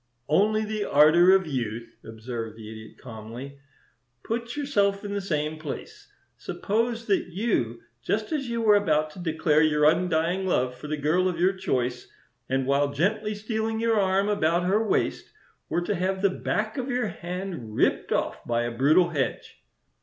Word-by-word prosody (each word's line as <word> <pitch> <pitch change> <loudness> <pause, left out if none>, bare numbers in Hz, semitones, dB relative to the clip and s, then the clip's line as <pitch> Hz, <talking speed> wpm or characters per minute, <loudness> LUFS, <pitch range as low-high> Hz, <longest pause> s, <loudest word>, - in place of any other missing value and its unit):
"Only 215 +6 +3
the 215 0 -2
ardor 155 +5 +6
of 190 -1 +2
youth," 120 -6 -4
observed 115 0 -6
the 110 -1 -9
Idiot, 110 0 -11
calmly. 120 +4 -9 0.6
"Put 235 +3 -4
yourself 205 -8 +1
in 200 - -4
the 200 - -1
same 155 -4 -2
place. 155 -3 -8 0.3
Suppose 230 +2 -2
that 200 -5 +1
you, 165 - -1 0.2
just 215 - -2
as 275 -5 -2
you 235 -1 -1
were 210 -2 +6
about 155 -6 +1
to 165 - -12
declare 160 -2 +2
your 150 -1 +3
undying 175 +3 +2
love 125 -7 +1
for 130 +4 -9
the 155 0 -2
girl 160 +6 +2
of 170 -2 -4
your 185 +2 +3
choice, 125 -9 -2 0.4
and 130 0 0
while 140 +1 +2
gently 210 +8 0
stealing 220 +1 -2
your 225 -1 +2
arm 195 +1 +2
about 175 -4 +1
her 200 +5 +2
waist, 220 - -1 0.4
were 175 - 0
to 175 - -1
have 190 +2 -1
the 200 - +4
back 215 +4 -2
of 255 +1 -3
your 245 -4 0
hand 175 - -6
ripped - - +1
off - - -1
by 120 0 0
a 120 - -2
brutal 155 +8 +4
hedge?" 140 -7 -3
175 Hz, 170 wpm, -26 LUFS, 140-205 Hz, 0.6 s, ardor